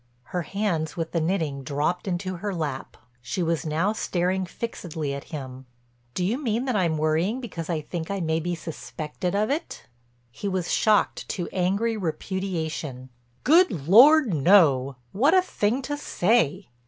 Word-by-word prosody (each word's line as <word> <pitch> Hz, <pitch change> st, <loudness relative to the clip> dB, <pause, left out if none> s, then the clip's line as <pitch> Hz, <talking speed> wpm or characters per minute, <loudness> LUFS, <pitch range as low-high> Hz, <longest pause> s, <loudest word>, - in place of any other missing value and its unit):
Her 180 Hz, -, 0 dB
hands 170 Hz, -3 st, -2 dB
with 165 Hz, -1 st, -3 dB
the 165 Hz, -, 0 dB
knitting 160 Hz, -5 st, -1 dB
dropped 150 Hz, +7 st, -1 dB
into 185 Hz, 0 st, -2 dB
her 200 Hz, +2 st, -3 dB
lap. 145 Hz, -5 st, -4 dB, 0.2 s
She 175 Hz, +9 st, -2 dB
was 165 Hz, 0 st, -1 dB
now 165 Hz, +7 st, +1 dB
staring 185 Hz, -2 st, -1 dB
fixedly 165 Hz, -9 st, -4 dB
at 140 Hz, -, -6 dB
him: 130 Hz, -4 st, -8 dB, 0.5 s
"Do 180 Hz, -, 0 dB
you 235 Hz, +9 st, -1 dB
mean 235 Hz, -1 st, -1 dB
that 255 Hz, -4 st, -1 dB
I'm 170 Hz, -5 st, +1 dB
worrying 160 Hz, +10 st, +1 dB
because 175 Hz, -10 st, -6 dB
I 165 Hz, -3 st, -1 dB
think 160 Hz, +2 st, -5 dB
I 200 Hz, 0 st, -2 dB
may 160 Hz, -2 st, 0 dB
be 175 Hz, +2 st, -2 dB
suspected 165 Hz, +2 st, -5 dB
of 215 Hz, +4 st, +1 dB
it?" 320 Hz, +4 st, -4 dB, 0.5 s
He 200 Hz, -, -5 dB
was 185 Hz, -3 st, -1 dB
shocked 215 Hz, -1 st, +2 dB
to 175 Hz, -3 st, -3 dB
angry 200 Hz, +5 st, 0 dB
repudiation. 160 Hz, -7 st, -3 dB, 0.3 s
"Good 260 Hz, -, +4 dB
Lord, 260 Hz, -, +7 dB
no! 140 Hz, -5 st, +4 dB, 0.2 s
What 280 Hz, -, +3 dB
a 370 Hz, -, +6 dB
thing 250 Hz, -, -1 dB
to 290 Hz, +3 st, -2 dB
say!" 190 Hz, -, +1 dB
175 Hz, 160 wpm, -25 LUFS, 155-205 Hz, 0.5 s, Lord